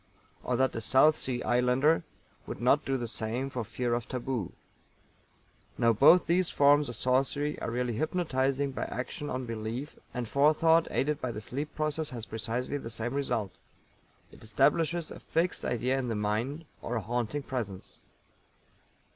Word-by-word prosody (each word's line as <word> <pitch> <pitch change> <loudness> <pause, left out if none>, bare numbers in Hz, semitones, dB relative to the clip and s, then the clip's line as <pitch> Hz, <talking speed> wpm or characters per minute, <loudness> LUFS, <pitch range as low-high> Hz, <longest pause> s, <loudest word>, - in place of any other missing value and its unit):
Or 125 - 0
that 130 +2 +1
a 115 - -2
South 135 +7 +5
Sea 125 -4 -2
Islander 125 +6 +3 0.5
would - - -6
not 130 +5 +3
do 135 0 0
the 120 -2 -3
same 115 +5 -3
for 125 -2 -3
fear 120 +2 -2
of 120 -1 -2
taboo. 125 -5 -3 1.3
Now 115 0 +4
both 145 +10 +6
these 180 +1 +2
forms 145 0 +4
of 120 - -6
sorcery 135 +3 0
are - - -2
really 120 0 -1
hypnotizing 140 -1 0
by - - -3
action 145 +5 -5
on 130 0 -3
belief, 115 +5 -5
and 125 -2 -4
Forethought 155 +5 +4
aided 150 +1 0
by 125 - -2
the 110 - -5
sleep 140 +7 -5
process 155 0 -1
has 120 -3 -6
precisely 115 +6 -3
the 115 - -7
same 115 +2 -3
result 115 -8 -1 0.8
it - - -15
establishes 155 +9 +1
a - - -8
fixed 170 +2 -1
idea 125 +2 0
in 130 - -2
the 115 - -1
mind, 110 +10 -2 0.2
or 120 - -3
a 115 - 0
haunting 120 +6 -2
presence. 110 -8 -5
130 Hz, 165 wpm, -29 LUFS, 115-145 Hz, 1.3 s, both